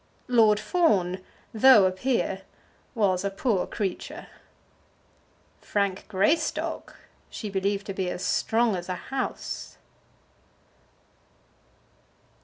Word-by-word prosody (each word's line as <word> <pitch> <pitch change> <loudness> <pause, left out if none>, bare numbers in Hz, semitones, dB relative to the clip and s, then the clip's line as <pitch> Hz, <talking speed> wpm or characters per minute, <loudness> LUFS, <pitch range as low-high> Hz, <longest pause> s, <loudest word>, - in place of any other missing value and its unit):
Lord 220 -4 +4
Fawn, 200 - +1 0.3
though 220 -3 +7
a 185 - +3
peer, 195 -1 -1 0.5
was 195 -5 +1
a 200 - 0
poor 195 0 0
creature. 195 -4 -4 1.3
Frank 200 -2 -2
Greystock 220 - 0 0.3
she 210 -3 -6
believed 200 +1 -1
to 195 - -4
be 190 -1 -2
as 180 - -4
strong 225 -2 +2
as 175 0 -6
a 180 - -1
house. 260 +9 -5
200 Hz, 95 wpm, -26 LUFS, 190-230 Hz, 1.3 s, though